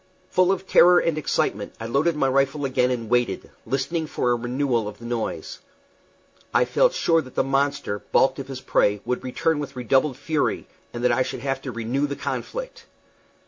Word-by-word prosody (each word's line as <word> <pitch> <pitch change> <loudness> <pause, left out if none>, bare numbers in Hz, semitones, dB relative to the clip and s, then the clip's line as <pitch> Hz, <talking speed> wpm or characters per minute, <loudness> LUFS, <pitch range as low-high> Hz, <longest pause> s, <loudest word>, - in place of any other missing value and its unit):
Full 185 0 +4
of 190 0 -2
terror 180 -1 +6
and 165 -3 +2
excitement, 155 - -1
I 115 - -5
loaded 140 +8 +1
my 140 -3 +1
rifle 135 +2 +1
again 125 -1 +1
and 120 -3 -2
waited, 120 -4 0 0.2
listening 140 +6 -1
for 125 - 0
a - - +3
renewal 120 -1 -1
of 105 - -7
the 120 - -12
noise. 120 -1 -4 0.9
I - - +3
felt - - +3
sure 165 - +3
that 130 -4 -13
the - - +2
monster, 135 -6 0
balked 130 +1 +3
of 135 - -6
his 135 -1 -7
prey, 105 -5 +2
would 125 +1 -2
return 155 +5 0
with 145 -3 -6
redoubled 130 +2 +1
fury, 150 +1 -1 0.3
and 120 0 -6
that 125 - +4
I 120 +2 +2
should 130 -1 -3
have 135 0 -2
to 135 - -5
renew 120 +5 -1
the 140 - -4
conflict. - - -5
135 Hz, 190 wpm, -24 LUFS, 120-150 Hz, 0.9 s, terror